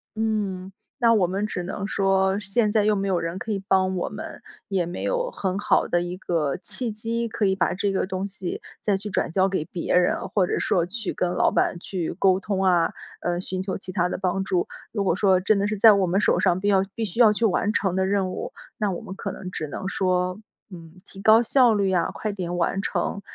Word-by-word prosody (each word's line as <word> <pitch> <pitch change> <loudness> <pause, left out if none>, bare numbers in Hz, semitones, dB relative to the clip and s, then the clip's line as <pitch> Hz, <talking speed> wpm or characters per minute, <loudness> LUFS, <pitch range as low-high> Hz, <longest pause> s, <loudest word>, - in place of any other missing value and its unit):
嗯， 205 -4 -2 0.3
那 230 -2 +5
我 205 -5 +3
们 195 +4 -2
只 180 -4 -4
能 200 +3 -4
说 195 -1 +2
现 210 +2 +1
在 215 -1 +3
又 210 0 +3
没 195 0 -1
有 190 -2 +1
人 165 +2 -4
可 220 - -5
以 195 -1 -4
帮 190 -1 +2
我 180 - -2
们， 210 +1 -8 0.3
也 190 -3 0
没 175 +1 -5
有 - - -1
很 190 -1 -2
好 205 - +2
的 175 - +1
一 175 +1 -4
个 160 -6 -1
契 235 +5 -4
机， 230 +2 -2
可 220 -1 -1
以 190 -1 +2
把 185 - +1
这 195 +1 -1
个 190 - 0
东 190 +1 -3
西 190 -2 -6 0.2
再 205 -2 +1
去 210 +2 -6
转 185 - -1
交 190 +2 +3
给 190 -5 -1
别 170 +1 -2
人， 180 0 +1
或 195 -3 +2
者 - - -1
说 175 -3 +1
去 215 +3 -4
跟 180 - -1
老 - - +3
板 175 - 0
去 175 -2 -4
沟 190 -1 +3
通 195 -1 -2
啊， 175 -3 +3 0.3
呃， 175 0 -1
寻 185 0 -4
求 190 0 -3
其 185 - -7
他 180 -1 +1
的 - - -3
帮 190 +1 -1
助。 180 -2 0 0.2
如 205 -3 -1
果 185 - +2
说 190 -2 +3
真 205 +3 +2
的 200 - +1
是 215 0 -2
在 215 +2 +8
我 200 -2 +2
们 185 +3 +1
手 - - +2
上 175 - +2
必 200 - -2
要 195 -2 +4
必 225 - -2
须 190 - -6
需 - - -5
要 220 -3 +7
去 220 +2 0
完 205 0 +1
成 190 -4 0
的 190 0 +1
任 195 -1 0
务， - - -5 0.3
那 210 -2 0
我 175 - -4
们 195 -3 -8
可 - - -4
能 185 - -7
只 155 -4 -5
能 170 +6 -5
说， 185 0 0 0.3
嗯， 165 -3 -12
提 195 - -11
高 220 +3 +6
效 240 0 +4
率 200 -2 +1
呀， 180 -3 +1
快 215 -1 -3
点 175 -3 -4
完 175 +3 0
成， 200 - -2
190 Hz, 260 characters per minute, -24 LUFS, 180-210 Hz, 0.3 s, 在